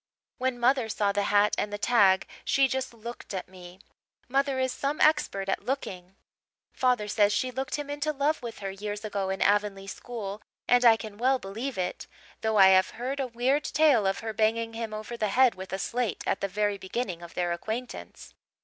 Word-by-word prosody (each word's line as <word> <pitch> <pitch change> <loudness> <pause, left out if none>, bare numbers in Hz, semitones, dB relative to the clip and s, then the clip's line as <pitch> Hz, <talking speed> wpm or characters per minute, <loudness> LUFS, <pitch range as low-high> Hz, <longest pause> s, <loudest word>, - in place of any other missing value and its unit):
When 255 -1 0
mother 245 -1 +2
saw 205 -1 +1
the 200 0 0
hat 205 0 +4
and 205 - -2
the 205 - -3
tag 200 -4 +4 0.2
she 275 -1 +3
just 260 0 -2
looked 235 -2 -8
at 185 - -4
me. 180 -1 -13 0.5
Mother 275 +1 +1
is 260 0 +1
some 285 +2 -2
expert 295 -11 +2
at 195 - -1
looking. 190 -9 -4 0.6
Father 250 -5 +1
says 205 -1 +3
she 255 +4 0
looked 265 +1 -3
him 290 -1 -4
into 290 +1 -2
love 295 +2 0
with 235 -2 -7
her 195 - -2
years 205 +2 -5
ago 200 -2 -2
in 190 0 0
Avonlea 205 -1 +1
school 205 0 -6 0.3
and 245 0 +4
I 230 -2 +7
can 215 -2 -9
well 260 +2 +3
believe 230 +4 -5
it 180 -1 -3 0.3
though 220 -1 +1
I 190 -1 +8
have 185 0 +5
heard 260 +4 -3
a 270 - -1
weird 250 +5 +1
tale 285 -12 +3
of 195 - -1
her 225 -1 -4
banging 225 +1 +1
him 225 -1 -4
over 215 +2 -6
the 220 -2 -1
head 250 +4 +4
with 190 0 -9
a 190 - -1
slate 230 0 -2
at - - -1
the 200 - 0
very 205 +1 -1
beginning 190 -2 -4
of 170 -1 -11
their 175 -1 0
acquaintance. 220 +8 -6
220 Hz, 205 wpm, -28 LUFS, 195-255 Hz, 0.6 s, I